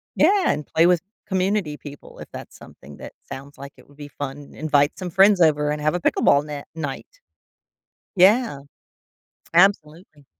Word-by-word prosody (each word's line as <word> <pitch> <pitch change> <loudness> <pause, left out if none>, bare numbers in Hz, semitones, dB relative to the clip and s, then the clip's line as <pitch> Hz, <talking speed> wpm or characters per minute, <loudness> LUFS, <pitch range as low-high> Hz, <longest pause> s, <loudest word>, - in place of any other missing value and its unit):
Yeah! 395 -2 +3
And 150 - -4
play 165 +1 +2
with 175 -2 +2 0.3
community 190 -5 -1
people 145 -1 -13
if - - -10
that's - - -10
something 75 0 -15
that - - -11 0.2
sounds 140 +2 -10
like 140 0 -10
it - - -19
would 145 - -21
be 145 -1 -9
fun. 140 +1 -8
Invite 145 -2 +1
some 185 - -5
friends 195 +3 +5
over 150 -2 +3
and 150 0 -4
have 155 +3 0
a - - -1
pickleball 145 -2 +2
net 145 -1 -8
night. 145 -4 -6 1.1
Yeah. 200 - +3 0.9
Absolutely. 165 -4 +1
150 Hz, 160 wpm, -22 LUFS, 145-185 Hz, 1.1 s, friends